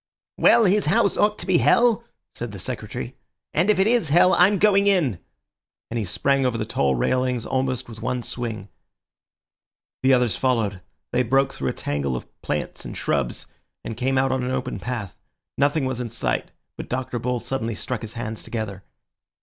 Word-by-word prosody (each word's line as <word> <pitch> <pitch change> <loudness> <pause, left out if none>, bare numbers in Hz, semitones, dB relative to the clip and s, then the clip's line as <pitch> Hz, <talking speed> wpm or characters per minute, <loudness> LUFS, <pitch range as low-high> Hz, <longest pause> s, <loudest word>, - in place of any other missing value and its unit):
"Well, 235 - +6
his 200 -2 +3
house 200 +4 +3
ought 210 0 +2
to - - -6
be 185 -3 +3
hell!" 235 -1 +4 0.3
said 120 -2 -5
the - - -6
Secretary; 90 - -6 0.4
"and 170 +6 +2
if 210 - +4
it 190 - +4
is 230 -8 +2
hell, 175 +5 +5
I'm 190 +3 +5
going 200 0 +4
in!" 155 - +2 0.7
and 120 - -1
he 105 - -2
sprang 135 +8 +1
over 125 -3 +1
the 110 - -2
tall 70 -10 +1
railings 125 - 0
almost 130 -1 -1
with 115 -2 -10
one 125 -1 -2
swing. 110 -5 -5 1.3
The 130 +1 +5
others 120 -6 +1
followed. 110 -7 0 0.3
They 125 - +2
broke 135 +3 +2
through - - -2
a - - -2
tangle 70 -2 -2
of 60 - -5 0.2
plants - - -3
and - - -7
shrubs, 70 -4 -1 0.4
and 115 - -5
came 130 +3 0
out 135 0 +2
on 130 -1 0
an 125 - -2
open 130 0 -2
path. 120 -6 -5 0.4
Nothing 145 +1 +2
was 130 -1 -2
in 120 - -4
sight, 115 - -2 0.3
but - - -7
Dr. 125 -1 -2
Bull 125 +1 -1
suddenly 115 -3 -3
struck 125 +1 -4
his 110 0 -8
hands 110 -1 -4
together. 100 -4 -5
125 Hz, 185 wpm, -23 LUFS, 110-150 Hz, 1.3 s, Well